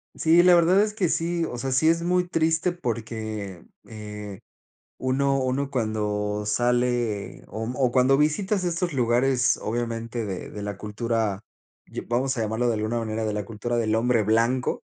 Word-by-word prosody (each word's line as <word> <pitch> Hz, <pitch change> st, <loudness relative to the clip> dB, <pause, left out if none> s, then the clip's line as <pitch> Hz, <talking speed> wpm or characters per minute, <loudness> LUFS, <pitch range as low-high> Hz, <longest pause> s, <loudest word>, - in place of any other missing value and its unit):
Sí, 165 Hz, +2 st, +5 dB
la 180 Hz, 0 st, +7 dB
verdad 175 Hz, +3 st, +5 dB
es 210 Hz, 0 st, -1 dB
que 185 Hz, -5 st, +1 dB
sí, 165 Hz, +1 st, 0 dB
o 120 Hz, -, -5 dB
sea, 135 Hz, +2 st, -2 dB
sí, 145 Hz, +5 st, +3 dB
es 165 Hz, +1 st, +3 dB
muy 180 Hz, +1 st, +1 dB
triste 165 Hz, +1 st, +1 dB
porque, 110 Hz, -, -5 dB, 0.2 s
eh, 105 Hz, -2 st, -8 dB, 0.6 s
uno 135 Hz, +1 st, +1 dB
uno 130 Hz, +2 st, -1 dB
cuando 105 Hz, -3 st, -1 dB
sale 120 Hz, -2 st, 0 dB
o 110 Hz, -, -5 dB
m 120 Hz, -, -4 dB
o 130 Hz, -3 st, +2 dB
cuando 130 Hz, +1 st, +4 dB
visitas 185 Hz, +6 st, +1 dB
estos 175 Hz, 0 st, -1 dB
lugares, 125 Hz, 0 st, +2 dB
obviamente 115 Hz, 0 st, -3 dB
de 95 Hz, -3 st, -5 dB
de 105 Hz, -, -8 dB
la 105 Hz, 0 st, -4 dB
cultura, 105 Hz, 0 st, -2 dB, 0.5 s
ya -, -, -6 dB
vamos 130 Hz, +3 st, 0 dB
a -, -, 0 dB
llamarlo 110 Hz, +3 st, 0 dB
de 120 Hz, -, +2 dB
alguna 110 Hz, +2 st, -1 dB
manera 110 Hz, 0 st, -3 dB
de 110 Hz, -, -1 dB
la 105 Hz, -1 st, -3 dB
cultura 115 Hz, +2 st, -3 dB
del 110 Hz, -1 st, +1 dB
hombre 115 Hz, -1 st, +2 dB
blanco, 115 Hz, +4 st, +1 dB
120 Hz, 170 wpm, -25 LUFS, 110-140 Hz, 0.6 s, la